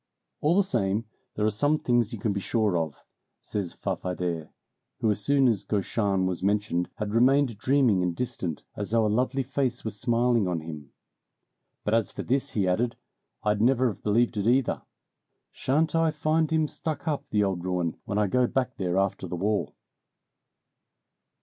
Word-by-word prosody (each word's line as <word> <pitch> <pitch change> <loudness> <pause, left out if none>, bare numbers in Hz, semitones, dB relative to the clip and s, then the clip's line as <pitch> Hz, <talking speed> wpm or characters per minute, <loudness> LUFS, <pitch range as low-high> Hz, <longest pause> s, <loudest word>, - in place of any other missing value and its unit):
"All 160 +5 +2
the 200 - +5
same, 105 - 0 0.3
there 105 - 0
are 110 - +3
some 145 +9 +2
things 120 -5 +1
you - - -4
can 110 -4 -1
be 100 - -2
sure 105 -1 +1
of," 80 -3 -1 0.5
says 100 -5 -4
Farfadet, 90 -3 -3 0.5
who 110 - +2
as 105 0 -2
soon 140 +2 +4
as 110 -5 +1
Gauchin 100 -2 0
was 90 -2 -2
mentioned 100 -3 0
had 105 -1 -4
remained 125 -1 +3
dreaming 130 -7 +3
and 90 -1 0
distant, 90 -9 -3
as 105 - -4
though 115 0 +3
a - - +3
lovely 130 +5 +1
face 130 -2 -1
was 105 -2 -4
smiling 120 -2 +2
on 85 -3 -1
him. 75 -3 -8 0.9
"But 105 - 0
as 115 -3 +2
for - - -5
this," 135 +2 0
he 100 -4 +1
added, 115 +7 +1 0.5
"I'd 105 0 +1
never 130 +1 +4
have 105 - -8
believed 115 +2 +2
it 100 +1 0
either! 130 +2 +2 0.7
Shan't 150 +4 0
I 165 0 +3
find 155 +1 +1
him 160 -1 +2
stuck 155 +1 -4
up, 150 -3 -2
the 105 -1 +2
old 95 -3 -1
ruin, 90 -3 -1
when 100 - -2
I 105 - +3
go 125 +5 +2
back 130 -1 -1
there 90 -1 -1
after 95 -1 0
the 90 - -4
war!" 100 +4 0
110 Hz, 180 wpm, -27 LUFS, 95-130 Hz, 0.9 s, the